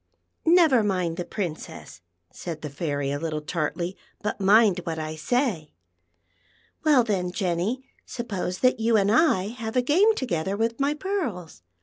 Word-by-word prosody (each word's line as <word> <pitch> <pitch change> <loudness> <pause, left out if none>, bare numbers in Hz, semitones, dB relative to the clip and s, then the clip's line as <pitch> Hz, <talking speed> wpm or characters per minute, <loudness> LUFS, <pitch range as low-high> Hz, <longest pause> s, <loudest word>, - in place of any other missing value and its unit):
" - - -51
Never 325 -9 +5
mind 180 -5 -1
the 180 - -2
Princess," 165 - -6 0.3
said 165 -3 -7
the 150 - -5
Fairy 145 -2 -2
a 145 - -2
little 155 -1 -2
tartly; 170 +3 -3 0.3
"but 210 -1 -3
mind 200 -1 +5
what 165 -1 -4
I 155 0 -4
say. 180 - -1 1.1
Well, 295 -6 +5
then, 190 -5 -1
Jenn\, 185 +7 -1 0.2
suppose 200 -7 -4
that 255 -1 +3
you 225 0 +3
and 200 0 +2
I 220 - +3
have 225 -1 -6
a 250 - +3
game 385 - +4
together 190 - -2
with 230 +3 -1
my 280 +2 +1
pearls. 265 - -4
200 Hz, 155 wpm, -25 LUFS, 170-245 Hz, 1.1 s, Never